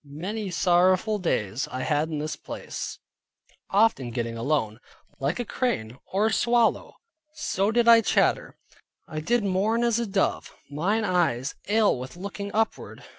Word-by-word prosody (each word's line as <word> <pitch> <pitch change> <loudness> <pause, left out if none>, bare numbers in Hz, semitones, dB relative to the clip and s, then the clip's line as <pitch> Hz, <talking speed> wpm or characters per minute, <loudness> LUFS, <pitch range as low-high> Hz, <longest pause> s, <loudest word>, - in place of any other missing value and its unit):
Many 185 +9 -5
sorrowful 185 +4 +2
days 115 - -1
I 130 - -4
had 155 +1 0
in 155 - -3
this 155 +1 -3
place, - - -7 0.7
often 200 - +2
getting 115 -1 -3
alone. 115 -3 -1 0.4
"Like 140 - -1
a 245 - -2
crane, 130 - -2
or 200 +3 +2
a 220 - +1
swallow, 235 0 +2 0.4
so 200 -9 0
did 235 +1 +2
I 230 -1 +8
chatter; - - +1 0.5
I 155 - -5
did 235 +8 +1
mourn 205 +5 +1
as 235 -1 +2
a 235 - -2
dove, 195 -1 -1 0.2
mine 195 +10 0
eyes 165 - +1 0.2
ail 210 - +3
with 130 +7 -8
looking 200 +2 -6
upward. 220 0 -2
185 Hz, 150 wpm, -26 LUFS, 145-220 Hz, 0.7 s, I